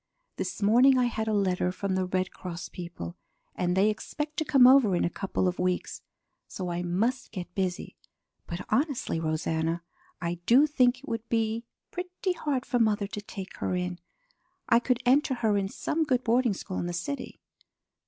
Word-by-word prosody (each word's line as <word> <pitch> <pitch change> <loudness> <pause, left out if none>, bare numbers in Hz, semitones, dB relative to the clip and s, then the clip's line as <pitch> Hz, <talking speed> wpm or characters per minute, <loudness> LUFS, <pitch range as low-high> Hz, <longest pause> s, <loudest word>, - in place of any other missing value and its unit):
This - - -3
morning 250 +6 +6
I 250 - +3
had 220 -2 -2
a - - +1
letter 185 -3 +1
from 195 +1 -3
the 185 0 0
Red 185 0 -1
Cross 175 -1 -7
people, 170 - -7 0.4
and 180 0 0
they 195 +2 +5
expect 300 +7 -5
to - - +1
come 275 -4 +6
over 255 -7 +6
in - - +1
a 170 - -1
couple 190 -1 -1
of 180 - -2
weeks. 180 0 -1 0.5
So 180 -2 -4
I 175 0 -2
must 205 +9 0
get 180 -4 -7
busy. 185 -2 -3 0.5
But 170 +3 -5
honestly, 280 - 0
Rosanna, 160 +1 -1 0.4
I 170 0 -3
do 260 +5 +7
think 255 -4 +3
it 280 +3 -14
would 230 -2 -4
be 225 0 0 0.3
pretty 360 +1 -3
hard 280 -6 -2
for 245 - 0
mother 215 -3 +2
to 205 +1 -6
take 195 -2 -8
her 185 - -1
in. 180 0 -3 0.7
I 230 - +5
could 250 +1 0
enter 265 +2 +4
her 220 -4 +1
in 195 -1 0
some 320 +9 -1
good 255 -5 +1
boarding 235 -2 +2
school 185 0 -5
in 175 - -2
the 175 - -3
city." 255 +10 -4
210 Hz, 185 wpm, -28 LUFS, 180-255 Hz, 0.7 s, do